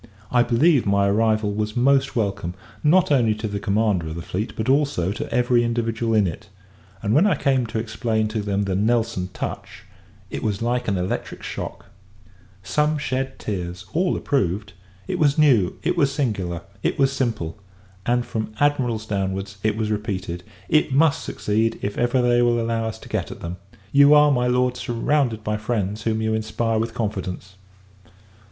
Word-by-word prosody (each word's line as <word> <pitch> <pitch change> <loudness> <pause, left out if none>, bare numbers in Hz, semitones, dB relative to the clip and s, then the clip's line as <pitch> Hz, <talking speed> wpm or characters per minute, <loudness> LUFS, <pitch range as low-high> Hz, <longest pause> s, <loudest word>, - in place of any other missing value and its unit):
I 125 - +4
believe, 120 +3 +3
my 100 0 +3
arrival 110 0 +2
was 105 +2 -2
most 135 +2 +3
welcome; 100 -5 -1 0.3
not 175 +3 +4
only 115 -6 +3
to 110 +1 -4
the 100 -1 -3
commander 100 -4 +1
of 80 - -5
the 85 - -6
fleet, 100 +7 -3
but 110 - -3
also 135 - +2
to - - -5
every 125 -1 +3
individual 115 -1 0
in 105 -2 +4
it: 90 +4 -5 0.5
and, 105 - +1
when 170 - +5
I 205 - +3
came 130 -3 +1
to 110 - -4
explain 110 0 -1
to 110 0 -2
them 100 0 -1
the 95 -1 -2
Nelson 105 -2 0
touch, - - -6 0.5
it - - -4
was 105 -2 -1
like 120 +1 -1
an 100 -3 +1
electric 90 +1 -3
shock. - - -6 0.8
Some 150 +10 +1
shed 135 -2 -2
tears, 90 -3 -5
all 175 +2 +1
approved 105 - -1 0.3
"It - - -2
was 145 -1 +3
new, 125 - +4
it 175 - +1
was 140 -5 +2
singular, 100 - -2 0.2
it - - 0
was 135 -1 +3
simple!" 110 -9 -2 0.4
and, 120 +2 +1
from 110 -1 -4
Admirals 125 -7 +1
downwards, 100 -1 -3
it 110 0 0
was 110 -1 -1
repeated 95 -4 -3 0.2
"It 155 -2 +2
must 145 +2 +3
succeed, 110 +2 0
if 100 0 -2
ever 120 +1 +1
they 120 0 +4
will 120 -1 +3
allow 115 0 -1
us 110 - -4
to - - -13
get - - -2
at - - -9
them! 85 +2 -5 0.3
You 140 +1 +7
are, 150 0 +6
my 125 -2 +2
Lord, 125 0 +1
surrounded 120 -1 0
by 105 0 -1
friends 105 -2 -2
whom 110 0 -1
you 110 0 0
inspire 110 +1 -1
with 115 +1 -3
confidence." 95 -4 -4
115 Hz, 180 wpm, -23 LUFS, 100-125 Hz, 0.8 s, You